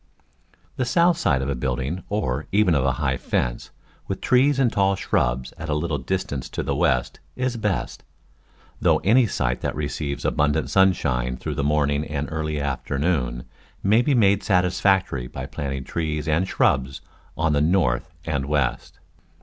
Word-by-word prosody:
The 130 Hz, -, +1 dB
south 170 Hz, +7 st, +3 dB
side 65 Hz, -, +1 dB
of -, -, -3 dB
a -, -, +1 dB
building, 65 Hz, +7 st, -3 dB
or 80 Hz, -10 st, -2 dB
even 100 Hz, -3 st, +3 dB
of 70 Hz, -4 st, +2 dB
a 65 Hz, -1 st, +2 dB
high 65 Hz, -2 st, -1 dB
fence, -, -, -2 dB, 0.4 s
with 95 Hz, -, -3 dB
trees 135 Hz, +2 st, +3 dB
and 130 Hz, -4 st, +2 dB
tall 95 Hz, -1 st, +2 dB
shrubs 65 Hz, -7 st, -1 dB
at 80 Hz, -, -6 dB
a 75 Hz, -, +1 dB
little 75 Hz, -1 st, -1 dB
distance 70 Hz, -2 st, -3 dB
to -, -, -4 dB
the -, -, -1 dB
west, 60 Hz, -1 st, +1 dB, 0.2 s
is 130 Hz, -1 st, -1 dB
best; 105 Hz, -4 st, -2 dB, 0.8 s
though -, -, +4 dB
any 115 Hz, +5 st, +4 dB
site 60 Hz, -9 st, -1 dB
that -, -, -2 dB
receives 75 Hz, -1 st, -3 dB
abundant 75 Hz, +1 st, +1 dB
sunshine 70 Hz, -10 st, +2 dB
through 75 Hz, +5 st, -4 dB
the 70 Hz, 0 st, -2 dB
morning 75 Hz, 0 st, +1 dB
and 75 Hz, -1 st, -3 dB
early 75 Hz, -1 st, -2 dB
afternoon 70 Hz, -2 st, -1 dB, 0.4 s
may 105 Hz, +4 st, +4 dB
be 140 Hz, +2 st, +2 dB
made 100 Hz, -3 st, +4 dB
satisfactory 90 Hz, -, +1 dB
by -, -, -6 dB
planting 70 Hz, -2 st, -4 dB
trees 75 Hz, 0 st, -3 dB
and 80 Hz, +4 st, +1 dB
shrubs 65 Hz, -6 st, +1 dB, 0.4 s
on 80 Hz, -1 st, +1 dB
the 70 Hz, -, +2 dB
north 80 Hz, -5 st, +1 dB, 0.2 s
and 70 Hz, -4 st, -2 dB
west. 70 Hz, -4 st, -1 dB
75 Hz, 165 wpm, -23 LUFS, 65-95 Hz, 0.8 s, though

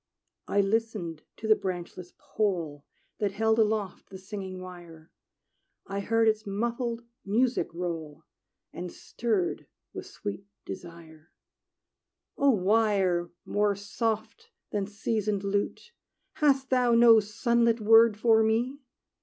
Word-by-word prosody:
I 200 Hz, -, +3 dB
listened 200 Hz, -6 st, -1 dB, 0.2 s
to 220 Hz, -, -5 dB
the 215 Hz, -, +6 dB
branchless 180 Hz, -1 st, -6 dB
pole 170 Hz, -9 st, -2 dB, 0.3 s
That 205 Hz, -2 st, 0 dB
held 220 Hz, +2 st, +2 dB
aloft 210 Hz, -3 st, 0 dB
the 190 Hz, -, -9 dB
singing 190 Hz, -1 st, -7 dB
wire; 175 Hz, -3 st, -11 dB, 0.7 s
I 195 Hz, +1 st, -4 dB
heard 225 Hz, +3 st, +2 dB
its 215 Hz, 0 st, +2 dB
muffled 235 Hz, +3 st, -2 dB, 0.2 s
music 240 Hz, +5 st, +1 dB
roll, 165 Hz, -3 st, -5 dB, 0.5 s
And 175 Hz, 0 st, -6 dB
stirred 215 Hz, -6 st, -2 dB, 0.3 s
with -, -, -7 dB
sweet 100 Hz, 0 st, -7 dB, 0.2 s
desire: 160 Hz, -, -10 dB, 1.0 s
"O 280 Hz, -, +3 dB
wire 195 Hz, -5 st, +2 dB, 0.2 s
more 205 Hz, -1 st, +1 dB
soft 220 Hz, +2 st, -3 dB, 0.2 s
than 200 Hz, -2 st, -1 dB
seasoned 210 Hz, -1 st, -2 dB
lute, 205 Hz, -, -2 dB, 0.5 s
Hast 270 Hz, -3 st, +2 dB
thou 250 Hz, -2 st, +4 dB
no 230 Hz, -1 st, +8 dB
sunlit 230 Hz, +2 st, +1 dB
word 225 Hz, 0 st, +6 dB
for 220 Hz, 0 st, +4 dB
me? 235 Hz, +5 st, +1 dB
210 Hz, 115 wpm, -28 LUFS, 180-225 Hz, 1.0 s, no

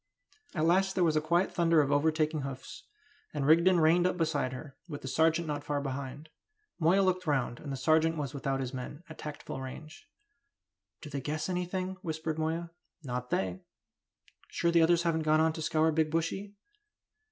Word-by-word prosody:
At 155 Hz, -1 st, +1 dB
last 190 Hz, +3 st, +3 dB
there 185 Hz, -, +3 dB
was 160 Hz, -2 st, +3 dB
quite 170 Hz, +4 st, +1 dB
a -, -, -18 dB
thunder 165 Hz, -2 st, +3 dB
of 145 Hz, -2 st, +2 dB
overtaking 155 Hz, +1 st, +2 dB
hoofs, 135 Hz, -1 st, -7 dB, 0.5 s
and 145 Hz, -2 st, -1 dB
Rigden 170 Hz, +4 st, +5 dB
reined 170 Hz, +3 st, +4 dB
up 180 Hz, -, -2 dB
beside 155 Hz, -6 st, 0 dB
her, 135 Hz, +2 st, -8 dB
with 145 Hz, -4 st, -7 dB
the -, -, -5 dB
sergeant 160 Hz, +4 st, +2 dB
not 145 Hz, -1 st, -3 dB
far 145 Hz, -1 st, -1 dB
behind. 140 Hz, +2 st, -5 dB, 0.5 s
Moya 180 Hz, +4 st, +4 dB
looked 185 Hz, -2 st, 0 dB
round, 130 Hz, -5 st, 0 dB
and 145 Hz, -, -7 dB
the 135 Hz, -, -3 dB
sergeant 160 Hz, +4 st, +3 dB
was 145 Hz, -2 st, -3 dB
without 135 Hz, -1 st, -2 dB
his 130 Hz, 0 st, -4 dB
men, 130 Hz, +5 st, -7 dB
at 160 Hz, -, -11 dB
tactful 145 Hz, -3 st, -6 dB
range. 155 Hz, -, -9 dB, 0.9 s
"Do 150 Hz, -, -9 dB
they 140 Hz, -1 st, -3 dB
guess 155 Hz, +6 st, -3 dB
anything?" 185 Hz, +1 st, -2 dB
whispered 160 Hz, -2 st, -3 dB
Moya. 165 Hz, +2 st, -2 dB, 0.3 s
"Not 125 Hz, -2 st, -4 dB
they!" 95 Hz, -1 st, -1 dB, 0.9 s
"Sure 170 Hz, -, 0 dB
the 170 Hz, 0 st, +5 dB
others 170 Hz, +1 st, +4 dB
haven't 165 Hz, -2 st, +1 dB
gone 155 Hz, 0 st, +3 dB
on 160 Hz, 0 st, +3 dB
to 160 Hz, -, -6 dB
scour 160 Hz, 0 st, +2 dB
Big 160 Hz, 0 st, +1 dB
Bushy?" 165 Hz, +6 st, -2 dB
155 Hz, 185 wpm, -30 LUFS, 145-170 Hz, 0.9 s, Rigden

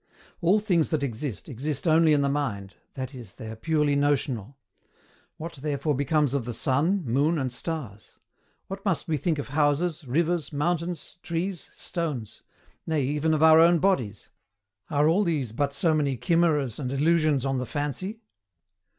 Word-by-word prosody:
All 185 Hz, +5 st, +4 dB
things 180 Hz, -7 st, +1 dB
that 155 Hz, -3 st, 0 dB
exist, 120 Hz, -, -4 dB
exist 140 Hz, +5 st, -3 dB
only 160 Hz, 0 st, +5 dB
in 145 Hz, -2 st, +3 dB
the -, -, +2 dB
mind, 120 Hz, -10 st, -2 dB, 0.2 s
that 130 Hz, +1 st, -5 dB
is, 120 Hz, -7 st, -11 dB
they 110 Hz, -, -8 dB
are -, -, -7 dB
purely 150 Hz, +3 st, +1 dB
notional. 140 Hz, -4 st, 0 dB, 0.8 s
What 165 Hz, 0 st, -7 dB
therefore 145 Hz, +1 st, -1 dB
becomes 140 Hz, 0 st, +1 dB
of 140 Hz, -5 st, -1 dB
the 120 Hz, -2 st, -4 dB
sun, 165 Hz, +9 st, +1 dB
moon 140 Hz, +7 st, +2 dB
and 130 Hz, -4 st, -2 dB
stars? 125 Hz, -8 st, -5 dB, 0.5 s
What 195 Hz, +1 st, -7 dB
must 185 Hz, -3 st, -1 dB
we 160 Hz, -, +1 dB
think 160 Hz, +2 st, 0 dB
of 145 Hz, -, -5 dB
houses, 155 Hz, +3 st, +1 dB
rivers, 165 Hz, +5 st, 0 dB
mountains, 170 Hz, +3 st, -2 dB
trees, 175 Hz, +2 st, -3 dB
stones; 145 Hz, -, -4 dB, 0.5 s
nay, 155 Hz, -3 st, +1 dB
even 150 Hz, +4 st, 0 dB
of 155 Hz, 0 st, +2 dB
our 160 Hz, 0 st, +8 dB
own 170 Hz, +1 st, +6 dB
bodies? 130 Hz, -, 0 dB, 0.6 s
Are 145 Hz, 0 st, +3 dB
all 180 Hz, +6 st, +3 dB
these 150 Hz, -, -1 dB
but 140 Hz, +5 st, -1 dB
so 160 Hz, +4 st, +1 dB
many 140 Hz, -4 st, 0 dB
chimeras 160 Hz, -, +1 dB
and 130 Hz, -3 st, -3 dB
illusions 150 Hz, -1 st, +2 dB
on 135 Hz, -1 st, 0 dB
the 125 Hz, -, -4 dB
fancy? 150 Hz, -, -3 dB
150 Hz, 165 wpm, -26 LUFS, 135-165 Hz, 0.8 s, our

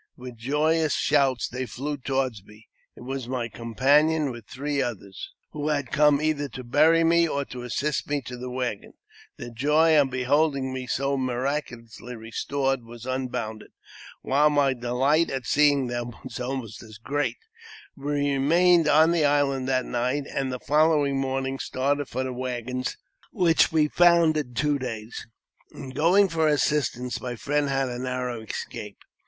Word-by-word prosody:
With 125 Hz, -1 st, -9 dB
joyous 150 Hz, +5 st, +1 dB
shouts 135 Hz, -4 st, +2 dB
they 130 Hz, 0 st, -5 dB
flew 145 Hz, +5 st, -4 dB
toward 135 Hz, -2 st, -1 dB
me. 105 Hz, +2 st, -18 dB, 0.3 s
It -, -, -14 dB
was 130 Hz, 0 st, -5 dB
my 125 Hz, -2 st, -2 dB
com 115 Hz, +1 st, -9 dB
panion, 150 Hz, +3 st, +3 dB
with 120 Hz, -3 st, -10 dB
three 140 Hz, +1 st, -2 dB
others, 100 Hz, -6 st, -5 dB, 0.2 s
who 150 Hz, 0 st, -4 dB
had 145 Hz, -4 st, -1 dB
come 150 Hz, -1 st, +4 dB
either 150 Hz, -2 st, -1 dB
to 130 Hz, -, -8 dB
bury 155 Hz, +7 st, +4 dB
me 170 Hz, +1 st, +4 dB
or 140 Hz, -2 st, -2 dB
to 125 Hz, -2 st, -8 dB
assist 140 Hz, +5 st, -2 dB
me 145 Hz, 0 st, 0 dB
to 125 Hz, 0 st, -8 dB
the 125 Hz, +1 st, -7 dB
waggons. 125 Hz, -5 st, -4 dB, 0.4 s
Their 120 Hz, -, -8 dB
joy 150 Hz, +6 st, +3 dB
on 140 Hz, -2 st, +3 dB
beholding 130 Hz, +1 st, +1 dB
me 130 Hz, -1 st, -5 dB
so 140 Hz, +2 st, 0 dB
miraculously 125 Hz, -2 st, -4 dB
restored 135 Hz, +4 st, -2 dB
w^as 115 Hz, 0 st, -12 dB
unbounded, 125 Hz, -4 st, -4 dB, 0.5 s
while 145 Hz, +3 st, +3 dB
my 145 Hz, -2 st, +2 dB
delight 130 Hz, +6 st, +1 dB
at 135 Hz, -3 st, -4 dB
seeing 145 Hz, +3 st, +3 dB
them 120 Hz, -1 st, -4 dB
was 130 Hz, -, -7 dB
almost 125 Hz, -4 st, -5 dB
as 110 Hz, -2 st, -12 dB
great. 145 Hz, +6 st, -2 dB, 0.6 s
We 145 Hz, 0 st, -1 dB
remained 165 Hz, +4 st, +4 dB
on 160 Hz, +2 st, +5 dB
the 165 Hz, -3 st, +2 dB
island 140 Hz, -2 st, +1 dB
that 130 Hz, -1 st, +1 dB
night, 125 Hz, +4 st, -1 dB
and 135 Hz, -1 st, -1 dB
the 125 Hz, -, -4 dB
following 150 Hz, -1 st, +2 dB
morning 135 Hz, 0 st, -2 dB
started 140 Hz, +2 st, -1 dB
for 130 Hz, +2 st, -3 dB
the 130 Hz, -1 st, -4 dB
waggons, 125 Hz, 0 st, -4 dB, 0.3 s
which 175 Hz, -5 st, +3 dB
we 155 Hz, -2 st, +3 dB
found 170 Hz, -1 st, +4 dB
in 130 Hz, -5 st, -3 dB
two 145 Hz, +3 st, +1 dB
days. 115 Hz, -4 st, -6 dB, 0.5 s
In 130 Hz, -, -8 dB
going 180 Hz, +8 st, +4 dB
for 165 Hz, -3 st, +1 dB
assistance, 140 Hz, -4 st, 0 dB
my 125 Hz, -1 st, -4 dB
friend 145 Hz, +4 st, -1 dB
had 135 Hz, -1 st, 0 dB
a 120 Hz, -1 st, -5 dB
narrow 125 Hz, -2 st, -3 dB
escape. 110 Hz, -, -7 dB
135 Hz, 165 wpm, -25 LUFS, 125-150 Hz, 0.6 s, on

